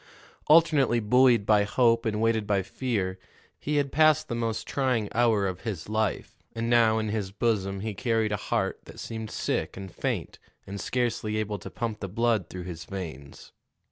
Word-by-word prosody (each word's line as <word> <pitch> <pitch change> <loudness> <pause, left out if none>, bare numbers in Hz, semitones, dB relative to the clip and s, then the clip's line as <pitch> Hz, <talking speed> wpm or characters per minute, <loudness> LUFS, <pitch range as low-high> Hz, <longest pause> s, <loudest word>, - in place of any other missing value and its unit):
Alternately 155 -6 +5
buoyed 120 0 +4
by 105 -1 +4
hope 115 +2 +2
and 105 -1 -1
weighted 110 -2 +1
by 100 -2 +1
fear, 95 -4 -2 0.4
he 150 - -2
had 140 -2 +1
passed 155 -1 +4
the - - -2
most 115 -2 -2
trying 125 -6 0
hour 115 -4 +3
of 95 -1 -3
his 100 -6 -5
life, 110 -2 -2
and 115 0 -2
now 115 -2 +5
in 110 -1 -1
his 105 -3 -2
bosom 100 -2 -1
he 110 0 -3
carried 110 0 0
a - - +1
heart - - 0
that - - -12
seemed 110 -1 -6
sick - - -2
and 95 -1 -7
faint - - -3 0.3
and 100 0 -6
scarcely 115 -3 -1
able 105 -1 -2
to - - -8
pump 115 -3 -4
the 100 - -4
blood 110 -3 0
through 90 -1 -7
his 85 -2 -7
veins. 80 -8 -8
110 Hz, 180 wpm, -27 LUFS, 100-120 Hz, 0.4 s, Alternately